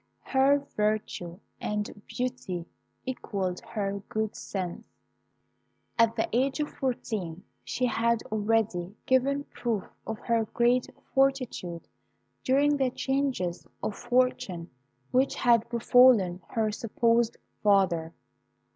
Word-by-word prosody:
Her 270 +1 +4 0.2
virtue 210 -4 -1 0.2
and 210 -1 -3
beauty 245 -9 -3 0.4
equalled 195 -8 -3
her 200 -2 -3
good 220 -1 -1
sense. 185 -3 -4 1.2
At 230 -1 +5
the - - 0
age 265 +4 +1
of 295 - -1
fourteen 205 -9 -3 0.2
she 250 - -1
had 235 -1 +1
already 210 -4 0
given 275 +2 +2
proof 230 -8 -2 0.2
of 220 - -3 0.4
great 240 +1 +3 0.3
fortitude 255 -11 0 0.6
during 285 +3 +3
the 265 -2 +2
changes 265 -10 -1 0.2
of 215 - -1
fortune 245 -8 0 0.4
which 260 +2 +3
had 235 -2 +3
befallen 235 -6 +5
her 220 -2 0
supposed 230 +1 +1 0.2
father. 185 -5 +3
225 Hz, 100 wpm, -28 LUFS, 195-255 Hz, 1.2 s, At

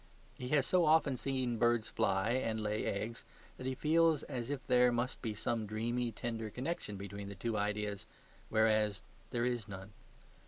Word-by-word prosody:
He 125 - -6
has 140 0 +3
so 180 -2 +4
often 155 -3 +4
seen 125 -3 -1
birds 120 -1 +3
fly 100 0 +1
and 115 -3 0
lay 105 0 -1
eggs 110 +4 -3 0.3
that 130 - -5
he 130 - -1
feels 160 +2 +3
as 120 0 -4
if 145 -1 -3
there 125 -2 +5
must 120 +2 -1
be 110 -3 -3
some 110 +1 -1
dreamy, 120 +3 -1
tender 115 0 -4
connection 125 -3 -4
between 100 0 -6
the 100 - -7
two 115 +4 -2
ideas, 105 -1 -2 0.4
whereas 110 -1 +3 0.3
there 120 0 0
is 120 -4 -1
none. 95 0 -8
115 Hz, 170 wpm, -35 LUFS, 105-130 Hz, 0.4 s, there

